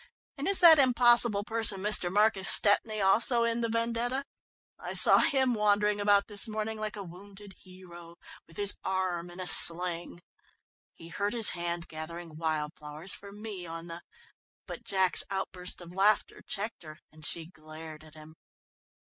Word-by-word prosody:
And 280 +2 -6
is 395 -1 -2
that 325 -3 +7
impossible 240 -5 +2
person, 220 -3 +2
Mr. 190 -3 +3
Marcus 205 -1 +2
Stepney, 215 +1 +2
also 230 +5 +1
in 235 0 -2
the 230 - -3
vendetta? 235 +4 -3 0.5
I - - -8
saw - - +8
him 265 -3 +1
wandering 210 -1 -1
about 205 -1 +1
this 205 +2 0
morning 215 0 -6
like 215 0 -6
a 205 - -8
wounded 195 +3 -14
hero, 175 -2 -15 0.3
with 165 - -18
his 205 -1 +1
arm 180 -2 -4
in 175 +1 -14
a 185 - -5
sling." 175 0 +5 0.7
"He 165 - -14
hurt 205 +4 -4
his 230 -3 +4
hand 170 -1 -5
gathering 160 +1 -10
wild 155 -2 -4
flowers 150 +5 -6
for 200 +2 -8
me 205 -4 -9
on 165 0 -9
the 170 0 -10 0.3
" - - -81
But - - -10
Jack's 190 -3 +1
outburst 190 -2 -5
of 175 0 -13
laughter 200 +3 -1
checked 210 +3 -6
her, 155 -2 -13
and 155 0 -19
she 165 +1 -3
glared 155 -1 -14
at 155 -1 -17
him. 155 0 -15
195 Hz, 165 wpm, -27 LUFS, 170-215 Hz, 0.7 s, saw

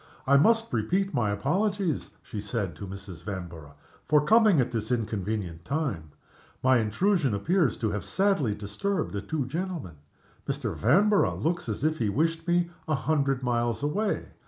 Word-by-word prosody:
"I 140 - +4
must 225 - +4
repeat 185 - 0
my 110 -4 +1
apologies," 180 - 0
she 105 -4 -6
said 100 -5 -3
to 100 - -7
Mrs. 95 -3 -9
Vanborough, 85 -6 -7 0.3
"for 150 -1 +4
coming 215 -5 +5
at 125 - +1
this 115 -1 -3
inconvenient 105 -6 -2
time. 125 - -2 0.6
My 130 -1 +5
intrusion 135 - +1
appears 160 - +1
to 110 -2 -1
have 105 - -3
sadly 190 - +1
disturbed 145 - -2
the 100 - -2
two 140 +6 -2
gentlemen. 160 - -4 0.5
Mr. - - -2
Vanborough 195 - +3
looks 165 -5 -1
as 110 +4 -3
if 155 +1 +1
he 110 -3 +1
wished 165 - 0
me 175 0 +2 0.2
a 155 - +2
hundred 135 -2 0
miles 120 +1 0
away. 200 +9 -1
130 Hz, 160 wpm, -27 LUFS, 105-175 Hz, 0.6 s, coming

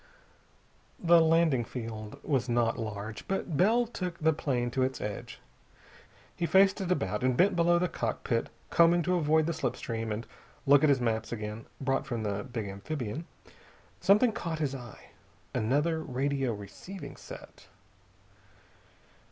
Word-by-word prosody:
The 170 -1 +5
landing 160 -6 +3
field 110 -3 -6
was 130 -4 0
not 120 -1 +1
large, 110 -1 -5
but 195 -4 -2
Bell 225 +9 +4
took 180 -7 -5
the 160 0 +3
plane 125 -5 -1
to 130 - -1
its 130 +1 0
edge. 105 -1 -6 1.0
He 170 - -1
faced 195 +2 +5
it 185 -1 -2
about, 105 - 0
and 130 -1 +2
bent 190 +4 +4
below 175 0 +4
the 180 +1 +1
cockpit 115 -3 -2 0.2
combing 170 0 +5
to 180 - +1
avoid 160 -2 +3
the 170 - 0
slip 140 -6 -2
stream 115 -1 -4
and 105 +2 -3 0.4
look 140 0 +6
at 155 - +4
his 140 -2 +4
maps 110 -2 -1
again, 105 0 -5
brought 135 -1 0
from 115 -2 -3
the 100 -1 -2
big 120 -5 -5
amphibian. 125 - -5 0.7
Something 210 +5 +5
caught 165 -6 -4
his 145 -3 -1
eye. 120 -5 -10 0.4
Another 150 +8 +1
radio 135 -2 -1
receiving 140 - -8
set. - - -12
135 Hz, 150 wpm, -30 LUFS, 115-170 Hz, 1.0 s, look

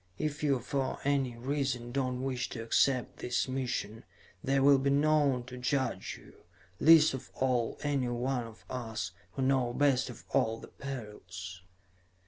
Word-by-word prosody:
If 150 -1 -2
you 140 -3 +3
for 130 +2 -2
any 135 -4 +1
reason 130 -2 -2
do 135 +1 0
not 125 0 -2
wish 130 0 -2
to 115 - -5
accept 125 +2 +2
this 125 +2 0
mission, 125 -5 -3 0.4
there 135 0 +2
will 140 -1 +7
be 140 +1 +1
none 145 -3 +3
to 125 +1 -9
judge 130 -1 -1
you, - - -17 0.4
least 160 -1 +7
of 130 0 -6
all, 125 -3 0
any 140 -4 +1
one 120 0 -1
of 115 -1 -15
us, 115 -6 -4 0.2
who 135 - -2
know 130 -2 +2
best 135 -2 +2
of - - -10
all 110 0 +2
the - - -11
perils." 95 -8 -7
130 Hz, 160 wpm, -31 LUFS, 120-140 Hz, 0.4 s, will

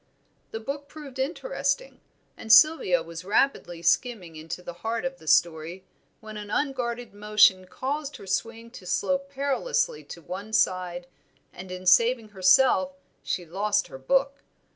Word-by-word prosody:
The 225 - -5
book 280 +5 -6
proved 280 -4 -11
interesting, - - -2 0.3
and 220 - -4
Sylvia 220 - +6
was 165 +1 -8
rapidly 185 -5 0
skimming 185 -4 0
into 160 +3 -7
the 175 - -7
heart 230 +2 -2
of 265 0 -4
the 160 - -16
story, 170 +3 +1 0.4
when 215 -1 -9
an 205 -1 -8
unguarded 245 -3 -2
motion 205 -3 +4
caused 280 +6 -4
her - - -12
swing 230 +4 -3
to 185 -6 -12
slope 275 +9 -1
perilously 280 - -1
to - - -10
one 200 +7 -7
side, 180 -3 0 0.5
and 180 +1 -10
in 185 0 -7
saving 230 +3 +4
herself 185 0 +4 0.3
she 175 - -3
lost 205 +5 -1
her 135 - -10
book. 275 - 0
215 Hz, 145 wpm, -26 LUFS, 185-270 Hz, 0.5 s, Sylvia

